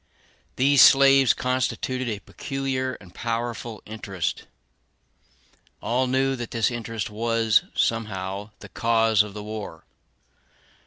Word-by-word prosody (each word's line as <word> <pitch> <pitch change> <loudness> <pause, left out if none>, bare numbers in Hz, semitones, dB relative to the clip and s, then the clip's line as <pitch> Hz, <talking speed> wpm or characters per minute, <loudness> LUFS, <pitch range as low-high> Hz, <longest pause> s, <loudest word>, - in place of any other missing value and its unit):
These 140 +1 +4
slaves 135 -1 +6
constituted 130 0 -1
a 105 - -2
peculiar 135 -2 -3
and 90 0 -16
powerful 115 -2 -4
interest. 100 -4 -4 1.3
All 130 +2 0
knew 135 +1 +1
that 120 -1 -5
this 115 +1 0
interest 115 -2 -4
was, 115 0 +2
somehow, 100 -3 -2
the - - -11
cause 115 -2 +2
of 105 -1 -5
the 105 - -6
war. 105 -6 -7
115 Hz, 110 wpm, -24 LUFS, 105-130 Hz, 1.3 s, slaves